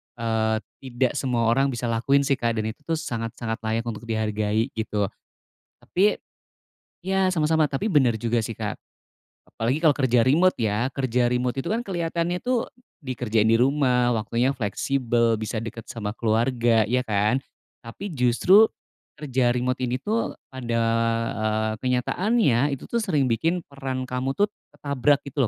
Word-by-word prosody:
eee, 110 -1 0 0.2
tidak 130 -1 -1
semua 125 -5 -1
orang 135 +3 +3
bisa 120 -3 -2
lakuin 140 +5 +2
sih 140 -1 0
Kak 115 -1 0
dan 110 0 -1
itu - - -17
tuh 165 - +1
sangat-sangat 115 -5 -4
layak 115 +1 0
untuk 115 -1 -6
dihargai 110 +1 -1
gitu. 105 -3 -2 0.7
Tapi 200 +4 +1 0.9
ya, 190 0 +1
sama-sama 155 -1 +2
tapi 145 +10 -2
bener 130 -8 +4
juga 115 +1 0
sih 115 0 -4
Kak, - - -4 0.7
apalagi 120 +6 -1
kalau 155 -4 +4
kerja 125 -4 +2
remote 155 +9 +3
ya, 115 +3 0
kerja 125 -2 0
remote 125 0 0
itu 170 - -3
kan 225 - +1
keliatannya 175 -4 -2
tuh, 250 -2 0 0.3
dikerjain 120 - 0
di 115 - +5
rumah 125 -1 +2
waktunya 115 +3 0
fleksibel 115 -1 0
bisa 110 +1 -3
deket 115 0 -8
sama 105 -3 -4
keluarga, 115 +1 +2
iya 120 +4 +1
kan? 105 +4 +2 0.4
Tapi 180 - -8
justru 155 - +5 0.5
kerja 135 -4 0
remote 125 +1 -1
ini 125 -1 -1
tuh 210 - -2 0.2
ada, 120 -3 -1 0.6
eee, 110 0 0
kenyataannya 140 - +1
itu 130 - -13
tuh 235 - -2
sering 150 - +1
bikin 165 +9 0
peran 135 -2 -5
kamu 130 +1 -3
tuh 205 +1 +1 0.2
ketabrak 140 0 +1
gitu 140 -3 -1
125 Hz, 150 wpm, -24 LUFS, 115-145 Hz, 0.9 s, di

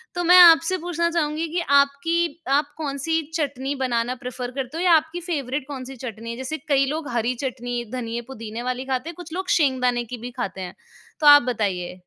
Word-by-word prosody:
तो 350 - -1
मैं 360 +2 +7
आपसे 335 +2 +7
पूछना 340 0 -1
चाहूँगी 320 0 -1
कि 350 - 0 0.2
आपकी 320 +4 +1 0.2
आप 295 0 -2
कौन-सी 310 +2 -1
चटनी 280 -3 -2
बनाना 250 -1 -1
प्रेफ़र 250 -1 -6
करते 270 +3 -5
हो, 350 - -2
या 360 - +4
आपकी 320 +2 +2
फ़ेवरेट 280 -5 -3
कौन-सी 265 -2 -7
चटनी 230 0 -6
है? 235 - -6
जैसे 260 +4 -4
कई 275 -1 +4
लोग 305 +2 -3
हरी 240 +1 0
चटनी, 245 -1 -3
धनिया-पुदीने 235 -1 -5
वाली 255 +1 -3
खाते 265 +4 -2
हैं, 340 - -8
कुछ 345 -2 -10
लोग 375 +1 -4
सींगदाने 250 -5 +1
की - - -3
भी 245 +2 -7
खाते 195 -5 -4
हैं, 180 0 -7 0.4
तो 300 - +2
आप 290 0 +10
बताइए। 185 -4 -3
270 Hz, 195 wpm, -23 LUFS, 245-320 Hz, 0.4 s, आप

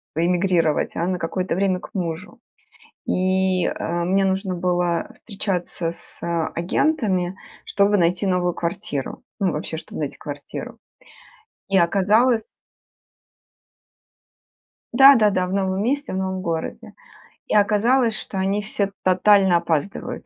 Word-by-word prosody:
п 165 - +1
е - - +2
эмигрировать, 175 -4 +1
а 170 - -1
на 180 -1 -1
какое-то 180 +2 -2
время 190 -1 +1
к - - -13
мужу. 175 0 -5 0.7
И, 185 0 +1
э, 170 0 -2
мне 195 +2 +2
нужно 190 -1 -1
было 175 -1 0
встречаться 180 -5 -3
с - - -17 0.4
агентами, 190 - 0 0.3
чтобы 200 +1 +2
найти 180 +2 +1
новую 180 -2 +1
квартиру, 150 -5 -4 0.2
ну, 190 -4 +1
вообще, 155 +1 -4
чтобы - - -8
найти 145 - -4
квартиру. 145 -1 -8 0.9
И 195 - +3
оказалось 210 +6 +3 2.5
Да-да-да, 215 -9 +6
в 180 - -5
новом 190 0 0
месте, 280 +4 -1
в - - -3
новом 190 0 -2
городе. 165 -2 -4 0.5
И - - 0
оказалось, 220 +3 +3
что 195 - -6
они 195 +2 0
все 200 -1 -2
тотально 190 0 +4
опаздывают. 170 +2 -3
185 Hz, 125 wpm, -22 LUFS, 175-200 Hz, 2.5 s, Да-да-да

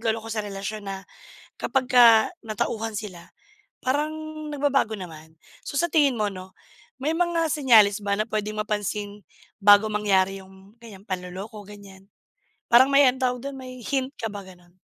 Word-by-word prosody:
nagloloko 225 -1 -2
sa 215 - -2
relasyon 200 +1 -6
na 195 0 -6 0.6
kapagka 245 -4 +5 0.2
natauhan 220 +1 -3
sila, 185 -5 -8 0.6
parang 295 +4 0 0.4
nagbabago 275 -6 0
naman. 160 -3 -11 0.3
So 285 - -6
sa 345 - +1
tingin 285 -6 +3
mo 210 -1 +1
'no, 185 0 -11 0.4
may 300 +4 0
mga 340 -1 +1
senyales 225 -9 +5
ba 200 0 0
na 215 - 0
puwedeng 215 0 -3
mapansin 205 -1 -4 0.4
bago 205 +1 +7
mangyari 195 -2 +1
yung 190 +1 -18
ganiyan 205 -4 -13
panloloko, 190 +3 -6
ganiyan? 200 -2 -14 0.6
Parang 250 +3 +7
may 280 0 +7
ano 250 - -3
tawag 250 -1 0
dun, 275 -1 -6
may 255 -1 -10
hint 265 +3 -2
ka 225 - -3
ba, 205 -1 -7
ganon? 180 -1 -18
215 Hz, 155 wpm, -24 LUFS, 195-255 Hz, 0.6 s, bago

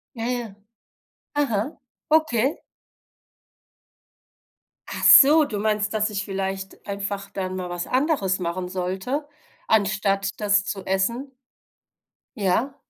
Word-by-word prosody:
Ja, 225 -1 -4
ja. 235 -5 -4 0.8
Aha, 270 -1 -1 0.3
okay. 305 -4 +2 2.3
Achso, 300 +3 +7
du 220 -7 -5
meinst, 210 0 0
dass 215 0 +1
ich 200 -1 -2
vielleicht 195 0 -5
einfach 200 0 -4
dann 185 -1 -4
mal 180 -1 -5
was 175 0 -4
anderes 255 - +1
machen 180 +1 -3
sollte, 190 +11 -3 0.4
anstatt 200 -1 +1
das 205 -1 +2
zu 195 -3 -5
essen? 235 +9 -1 1.1
Ja. 220 +7 0
205 Hz, 100 wpm, -23 LUFS, 190-245 Hz, 2.3 s, Achso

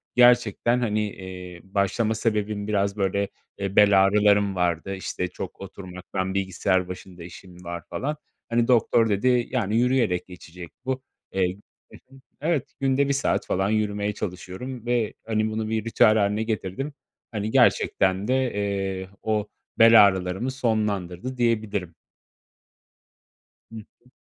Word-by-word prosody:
gerçekten, 120 -1 +4
hani, 105 -3 0
eee, 90 -2 -9
başlama 100 +3 0
sebebim 105 -2 -1
biraz, 100 -1 0
böyle, 100 0 0 0.3
eee, 100 -1 -4
bel 100 -2 +6
ağrılarım 100 0 +3
vardı, 90 +2 -1
işte, 90 -1 -3
çok - - -8
oturmaktan, 95 0 -5
bilgisayar 95 -1 0
başında 90 -1 -9
işim 90 +1 -12
var 85 -1 -6
falan. 150 +3 -3 0.3
Hani, 115 0 +2
doktor 115 -2 +3
dedi, 120 +4 +2
yani, 110 -4 0
yürüyerek 120 -7 +1
geçecek 90 -1 -11 0.2
bu. 130 0 -2 0.3
Eee 95 -1 0 0.4
Hı - - -12 0.2
hı. - - -15 0.2
Evet, 155 -3 -1
günde 135 +1 +2
1 140 - +1
saat 140 - 0
falan 95 +1 0
yürümeye 105 -1 0
çalışıyorum 105 +7 -6
ve, 120 -3 0
hani, 110 -1 0
bunu 110 0 -3
bir 110 0 -1
ritüel 115 -1 +4
hâline 105 +1 +1
getirdim. 110 +5 -3 0.4
Hani, 105 0 -3
gerçekten 95 -1 +3
de, 130 - +2 0.2
eee, 95 -2 -2
o 110 -1 0 0.3
bel 115 -2 +9
ağrılarımı 95 +6 -2
sonlandırdı 110 -2 -2
diyebilirim. 105 -7 -1 1.8
Hı - - -10
hı. 115 +3 -15
105 Hz, 135 wpm, -25 LUFS, 95-115 Hz, 1.8 s, bel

